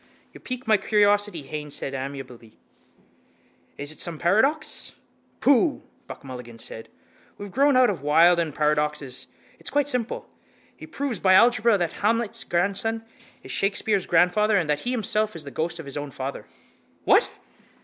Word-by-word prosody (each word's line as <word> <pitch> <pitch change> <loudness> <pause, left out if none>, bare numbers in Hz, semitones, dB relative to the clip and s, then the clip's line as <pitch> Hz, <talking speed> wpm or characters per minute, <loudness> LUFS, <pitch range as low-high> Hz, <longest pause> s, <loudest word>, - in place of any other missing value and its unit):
—You - - -12
pique 255 0 -6
my 220 -2 +4
curiosity, 205 -4 +2
Haines 150 +1 -6
said 135 - -4
amiably. 130 -4 -7 1.2
Is 145 +1 -2
it 155 - -9
some 170 -3 0
paradox? 265 - 0 0.5
—Pooh! 285 +3 +3 0.2
Buck - - -10
Mulligan 125 -3 -9
said. 115 0 -7 0.5
We 205 - -7
have 200 - -10
grown 280 +1 +4
out 250 -3 +5
of 180 - -6
Wilde 165 +4 +5
and 165 -2 -1
paradoxes. 150 -3 -1 0.3
It's - - -4
quite 285 0 +1
simple. 250 -5 -2 0.5
He - - -11
proves 270 -8 -3
by 185 0 +5
algebra 230 -1 +5
that 175 -3 -2
Hamlet's 230 +1 0
grandson 200 +5 -1 0.4
is - - -8
Shakespeare's 200 0 0
grandfather 200 +5 +3
and 175 -5 0
that 150 -1 0
he 245 - -4
himself 215 -3 0
is 165 - -3
the 140 - -8
ghost 165 +5 -3
of 165 - -8
his 140 +1 -6
own 145 0 -4
father. 135 +1 -6 0.6
—What? - - +4
180 Hz, 160 wpm, -24 LUFS, 150-220 Hz, 1.2 s, out